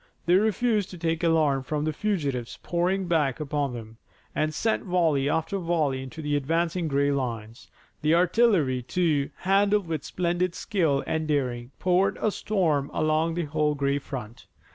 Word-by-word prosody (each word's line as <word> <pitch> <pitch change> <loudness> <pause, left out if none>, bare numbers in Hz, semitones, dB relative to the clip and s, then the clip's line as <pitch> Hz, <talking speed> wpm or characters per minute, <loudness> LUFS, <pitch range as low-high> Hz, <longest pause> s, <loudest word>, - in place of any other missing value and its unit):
They 175 - +3
refused 215 +1 +2
to 180 - -9
take 165 0 -1
alarm 155 -5 +3
from 150 +3 -2
the 155 - -1
fugitives 145 - -2
pouring 180 +2 0
back 150 -7 +1
upon 145 -3 -2
them, 115 -1 -9 0.4
and 155 0 0
sent 220 +8 0
volley 165 -7 +1
after 165 +6 -1
volley 160 -6 0
into 135 +4 -8
the 145 0 0
advancing 165 +4 0
gray 140 0 +1
lines. 115 -4 -4 0.3
The 155 +2 +3
artillery, 175 - +3
too, 150 0 0
handled 200 +1 +2
with 160 -3 -3
splendid 175 0 -1
skill 165 -11 0
and 160 0 -2
daring, 125 -5 -1
poured 185 +1 +2
a 215 - +1
storm 165 -11 0
along 155 +1 +1
the 175 -2 -1
whole 150 0 0
gray 140 0 0
front. 120 -5 -8
155 Hz, 160 wpm, -26 LUFS, 140-180 Hz, 0.4 s, They